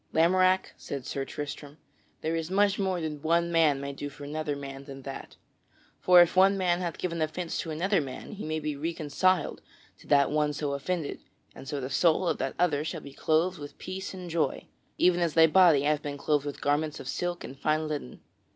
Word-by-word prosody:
"Lamorack," 185 Hz, +3 st, +3 dB
said 140 Hz, -3 st, -6 dB
Sir 135 Hz, -1 st, -3 dB
Tristram, 145 Hz, 0 st, -7 dB, 0.4 s
"there 160 Hz, +1 st, -1 dB
is 165 Hz, 0 st, -3 dB
much 200 Hz, +1 st, +2 dB
more 190 Hz, -2 st, 0 dB
than 155 Hz, -3 st, -4 dB
one 170 Hz, +2 st, +1 dB
man 160 Hz, -4 st, +3 dB
may 140 Hz, 0 st, -5 dB
do 145 Hz, +1 st, -5 dB
for 145 Hz, -, -12 dB
another 150 Hz, 0 st, -3 dB
man 135 Hz, -1 st, -8 dB
than 135 Hz, -1 st, -10 dB
that. 135 Hz, 0 st, -8 dB, 0.6 s
For 180 Hz, -1 st, +7 dB
if 175 Hz, -, -3 dB
one 195 Hz, +1 st, +5 dB
man 180 Hz, -2 st, +1 dB
hath 170 Hz, -3 st, -3 dB
given 170 Hz, -2 st, -3 dB
offence 165 Hz, +2 st, -2 dB
to 165 Hz, -, -4 dB
another 175 Hz, +4 st, +1 dB
man, 130 Hz, -3 st, -7 dB
he 210 Hz, -, -7 dB
may 155 Hz, 0 st, -2 dB
be 150 Hz, -1 st, -3 dB
reconciled 165 Hz, +3 st, 0 dB, 0.4 s
to -, -, -17 dB
that 140 Hz, -1 st, +4 dB
one 150 Hz, 0 st, +1 dB
so 145 Hz, 0 st, -2 dB
offended, 155 Hz, +3 st, -3 dB, 0.3 s
and 135 Hz, -, -11 dB
so 145 Hz, -2 st, -3 dB
the 130 Hz, 0 st, -5 dB
soul 175 Hz, +3 st, +3 dB
of -, -, 0 dB
that 135 Hz, -, -2 dB
other 155 Hz, -4 st, +2 dB
shall 160 Hz, 0 st, -4 dB
be 140 Hz, -, -11 dB
clothed 165 Hz, +5 st, +1 dB
with 145 Hz, -1 st, -9 dB
peace 190 Hz, +1 st, -6 dB
and 185 Hz, -2 st, -8 dB
joy, 160 Hz, -5 st, -1 dB, 0.3 s
even 180 Hz, 0 st, +4 dB
as 170 Hz, -3 st, 0 dB
thy 165 Hz, -1 st, +8 dB
body 160 Hz, -4 st, +5 dB
hath 150 Hz, 0 st, +1 dB
been 145 Hz, -1 st, -5 dB
clothed 145 Hz, 0 st, 0 dB
with 145 Hz, -, -6 dB
garments 150 Hz, +1 st, 0 dB
of -, -, -8 dB
silk 175 Hz, 0 st, -3 dB
and 135 Hz, +1 st, -9 dB
fine 155 Hz, +1 st, +1 dB
linen." 150 Hz, -, -5 dB
155 Hz, 210 wpm, -28 LUFS, 145-175 Hz, 0.6 s, thy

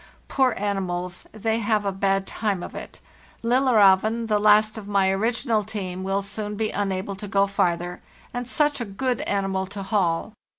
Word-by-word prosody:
Poor 260 Hz, -4 st, +2 dB
animals, 180 Hz, -3 st, -2 dB
they 220 Hz, +1 st, -1 dB
have 215 Hz, -1 st, +1 dB
a 200 Hz, -, +1 dB
bad 195 Hz, 0 st, 0 dB
time 200 Hz, -5 st, -2 dB
of -, -, -7 dB
_ -, -, -14 dB
it! -, -, -8 dB, 0.4 s
'Lillerzeven, 230 Hz, -3 st, +4 dB
the 210 Hz, -2 st, +1 dB
last 215 Hz, +1 st, +5 dB
of 215 Hz, -3 st, -8 dB
my 195 Hz, -2 st, +2 dB
original 225 Hz, +2 st, 0 dB
team, 190 Hz, -4 st, -5 dB
will 195 Hz, +1 st, -1 dB
soon 210 Hz, +1 st, -4 dB
be 215 Hz, +1 st, -1 dB
unable 195 Hz, -1 st, -2 dB
to 205 Hz, +2 st, -7 dB
go 195 Hz, 0 st, +3 dB
farther—and 195 Hz, +5 st, -3 dB
such 290 Hz, +1 st, +1 dB
a -, -, -1 dB
good 240 Hz, +4 st, -2 dB
animal 195 Hz, -1 st, -1 dB
to 195 Hz, 0 st, -6 dB
haul! 190 Hz, -1 st, 0 dB
205 Hz, 170 wpm, -24 LUFS, 195-220 Hz, 0.4 s, last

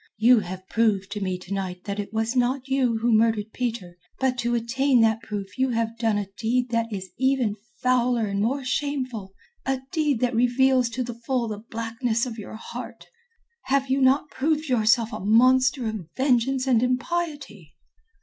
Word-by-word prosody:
You 235 Hz, +2 st, +6 dB
have 185 Hz, -1 st, -7 dB
proved 210 Hz, -4 st, +1 dB
to 205 Hz, 0 st, -4 dB
me 185 Hz, -2 st, -1 dB
to 180 Hz, +2 st, -7 dB
night 185 Hz, -2 st, -4 dB
that 200 Hz, 0 st, -4 dB
it 205 Hz, -, -4 dB
was 225 Hz, +2 st, -1 dB
not 255 Hz, +2 st, +1 dB
you 260 Hz, -4 st, +1 dB
who 235 Hz, +1 st, +1 dB
murdered 220 Hz, -1 st, +2 dB
Peter; 220 Hz, -8 st, -4 dB, 0.2 s
but 265 Hz, -1 st, +1 dB
to 240 Hz, 0 st, 0 dB
attain 245 Hz, +2 st, +2 dB
that 225 Hz, 0 st, +3 dB
proof 205 Hz, -2 st, -6 dB
you 260 Hz, 0 st, +2 dB
have 230 Hz, -1 st, -1 dB
done 225 Hz, -3 st, +1 dB
a 205 Hz, -, -1 dB
deed 245 Hz, +2 st, 0 dB
that 230 Hz, -1 st, 0 dB
is 190 Hz, -3 st, -6 dB
even 260 Hz, -5 st, +1 dB, 0.3 s
fouler 250 Hz, -2 st, +2 dB
and 200 Hz, -1 st, -2 dB
more 260 Hz, +5 st, -1 dB
shameful, 255 Hz, -8 st, -3 dB, 0.3 s
a 265 Hz, -1 st, -1 dB
deed 300 Hz, -7 st, +1 dB
that 250 Hz, 0 st, +1 dB
reveals 250 Hz, +1 st, +3 dB
to 250 Hz, +2 st, -3 dB
the 240 Hz, 0 st, -5 dB
full 235 Hz, +1 st, -2 dB
the 210 Hz, -2 st, -5 dB
blackness 230 Hz, +1 st, -2 dB
of 235 Hz, -3 st, -6 dB
your 210 Hz, -, -8 dB
heart. 220 Hz, -, -8 dB, 0.6 s
Have 270 Hz, 0 st, +1 dB
you 270 Hz, +1 st, +2 dB
not 270 Hz, +3 st, +3 dB
proved 310 Hz, +1 st, -1 dB
yourself 230 Hz, -1 st, +3 dB
a -, -, -4 dB
monster 255 Hz, +5 st, +4 dB
of 210 Hz, -7 st, -5 dB
vengeance 260 Hz, 0 st, +2 dB
and 245 Hz, -4 st, +3 dB
impiety?" 255 Hz, -, -3 dB
235 Hz, 180 wpm, -25 LUFS, 220-260 Hz, 0.6 s, You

